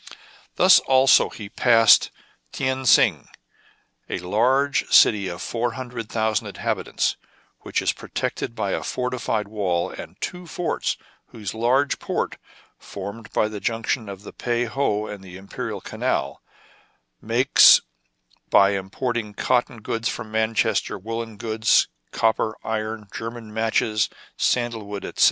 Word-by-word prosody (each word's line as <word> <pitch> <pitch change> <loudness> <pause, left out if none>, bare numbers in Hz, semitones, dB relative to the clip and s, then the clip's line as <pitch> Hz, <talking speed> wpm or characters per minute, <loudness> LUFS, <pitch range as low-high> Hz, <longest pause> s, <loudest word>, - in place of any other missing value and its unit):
Thus - - +7
also 130 0 +4
he 105 - -9
passed 115 +1 +5 0.4
Tien 130 0 -2
Sing, 110 - +4 0.8
a - - -2
large 125 +10 +1
city 100 -3 +5
of 85 -1 -6
four 120 0 -2
hundred 125 -4 -6
thousand 110 -1 0
inhabitants, - - -2 0.4
which - - -2
is - - +1
pro - - -12
tected 115 - -3
by 100 -4 -2
a - - -1
fortified 125 -4 -2
wall 95 -5 -1
and - - -10
two 180 -1 -6
forts, 170 +1 -2 0.3
and - - -14
whose 100 -3 -4
large 125 +5 +1
port, - - -3 0.4
formed 100 +3 -8
by 105 - +1
the 105 -1 -6
junction 115 0 -2
of 100 0 -9
the - - -10
Pei 120 0 -1
ho 110 -4 -1
and 105 -2 -8
the 90 -1 -10
Imperial 95 +1 -6
Canal, - - -2 0.8
makes 120 +5 +6 0.3
— - - -38
by 100 0 +6
importing 105 +3 -3
cotton 120 -2 0
goods 115 -1 -2
from 110 - -6
Manchester, 110 -1 0
woollen 115 +2 -6
goods, 110 0 +2 0.2
copper, 110 -1 0
iron, 110 0 -3
German 115 -1 -7
matches, 110 -1 +1 0.3
sandal 120 -3 0
wood, 100 -1 -6
etc. - - -8
110 Hz, 135 wpm, -23 LUFS, 105-120 Hz, 0.8 s, Thus